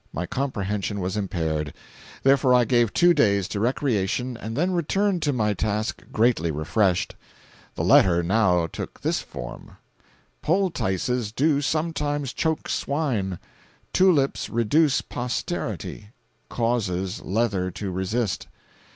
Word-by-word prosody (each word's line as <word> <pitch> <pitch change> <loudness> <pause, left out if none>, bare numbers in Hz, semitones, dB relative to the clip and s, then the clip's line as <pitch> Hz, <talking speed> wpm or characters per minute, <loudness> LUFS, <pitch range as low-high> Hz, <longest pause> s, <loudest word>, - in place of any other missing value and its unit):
My 90 - -3
comprehension 105 -5 -2
was 95 +2 -2
impaired. 80 -7 -2 0.5
Therefore 135 -1 +5
I 125 -1 +4
gave 120 -2 +3
two 175 0 +5
days 100 - +2
to 100 - -3
recreation, 125 0 0
and 115 +1 -6
then 175 +5 +1
returned 185 +2 +1
to 145 - +1
my 110 -5 +1
task 110 +1 -2
greatly 110 -7 +2
refreshed. 90 +5 +1 0.6
The - - -2
letter 85 -2 +5
now 90 -2 +3
took 80 - -7
this - - 0
form: - - -9 0.6
"Poultices 125 - 0
do 145 +4 +2
sometimes 145 -3 -1
choke 160 -1 -1
swine; 120 - -1 0.6
tulips 170 -8 +3
reduce 130 +6 +2
posterity; 120 -3 -4 0.4
causes 100 -6 -1
leather 100 -3 0
to 95 +1 -5
resist. 95 +3 -2
115 Hz, 115 wpm, -24 LUFS, 95-140 Hz, 0.6 s, Therefore